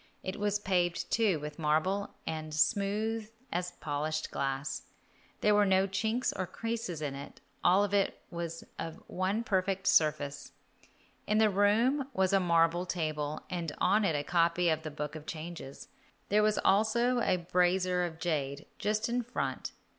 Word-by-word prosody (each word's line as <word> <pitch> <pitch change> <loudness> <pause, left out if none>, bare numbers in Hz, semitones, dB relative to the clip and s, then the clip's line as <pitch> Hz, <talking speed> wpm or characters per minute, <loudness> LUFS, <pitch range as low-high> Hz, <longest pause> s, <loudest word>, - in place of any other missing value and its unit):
It 185 +2 -4
was 205 0 +1
paved, 180 -4 0
too, 210 -8 +3
with 150 +1 -7
marble, 165 +6 +1 0.2
and 155 -1 -4
smooth 210 +5 +1 0.2
as 180 0 -2
polished 155 +1 -3
glass. 135 +1 -2 0.6
There 210 - +4
were 205 0 +5
no 190 -1 +4
chinks 220 +5 0
or 185 -1 -2
creases 225 -5 -4
in 145 -2 -2
it, 140 +1 -9 0.2
all 195 +3 +5 0.4
was 170 -1 -5 0.2
of 165 -1 -4
one 190 +5 -1
perfect 190 -3 0
surface. 145 -4 +2 0.7
In 210 - +2
the 215 -1 +5
room 230 +8 +3
was 190 0 +2
a 195 - +6
marble 170 0 +2
table, 155 -3 -2
and 170 -4 -3
on 210 +2 +3
it 170 -6 +2
a 145 - 0
copy 170 +1 +2
of 160 -1 +1
the 155 - -5
Book 150 0 -5
of 155 -1 -9
Changes; 160 -4 -7 0.4
there 210 +1 +4
was 215 0 +2
also 235 +5 +3
a 185 - +3
brazier 180 +1 +2
of 165 -2 -4
jade 145 -4 -2
just 210 +1 0
in 245 +1 0
front. 245 +1 -3
180 Hz, 155 wpm, -31 LUFS, 155-205 Hz, 0.7 s, a